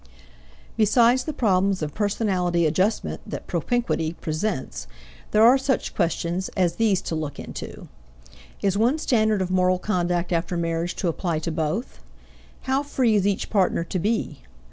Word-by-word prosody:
Besides 235 +3 +4
the 310 - -2
problems 195 - +1
of 150 -1 -4
personality 190 -5 0
adjustment 185 +8 0
that - - -6
propinquity 235 -10 -1
presents, 160 -1 -3 0.4
there 215 - +4
are 250 +4 +7
such 265 -1 -1
questions 170 +1 -1
as 175 -2 +1
these 215 -5 +2
to - - -4
look 155 -3 -4
into: - - -8 0.8
Is 195 -1 +2
one 245 +7 +3
standard 220 -9 +2
of 185 - -4
moral 185 0 +3
conduct 175 -2 -1
after 170 +1 -1
marriage 165 +1 -1
to 185 - -2
apply 170 0 -1
to 165 +2 -3
both? 160 - -3 0.6
How 265 +1 0
free 260 -5 +1
is 200 -2 +2
each 200 -1 -1
partner 190 -4 +2
to 180 +2 -3
be? 215 - -1
185 Hz, 150 wpm, -24 LUFS, 170-220 Hz, 0.8 s, are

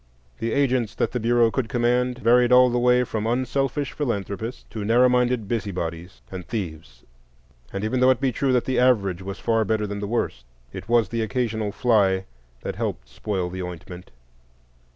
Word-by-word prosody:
The 115 - -2
agents 125 -5 +1
that - - 0
the 125 - -2
Bureau 115 0 +3
could 125 -3 -2
command 125 +1 +1
varied 125 0 +4
all 125 0 +6
the 120 - +1
way 125 0 +4
from 110 -2 -3
unselfish 130 +3 -1
philanthropists 115 -3 -4
to 110 - -5
narrow 120 +4 +4
minded 125 -3 +1
busybodies 90 -5 -4
and 95 -1 -6
thieves; 80 - -6 0.7
and 100 - -4
even 110 +4 0
though 130 +1 +5
it 130 - +3
be 135 -1 +1
true 135 +2 0
that 125 -2 +2
the 130 -1 0
average 100 -8 +2
was 95 +1 -6
far 115 -1 +1
better 110 0 0
than 100 0 -5
the 100 - -4
worst, 100 - -2 0.3
it - - -8
was 115 -4 +3
the 115 -1 -2
occasional 110 -2 -1
fly 100 -5 +2 0.4
that - - -5
helped - - -4
spoil 95 - -3
the 95 0 -5
ointment. 90 +1 -8
115 Hz, 180 wpm, -24 LUFS, 100-125 Hz, 0.7 s, all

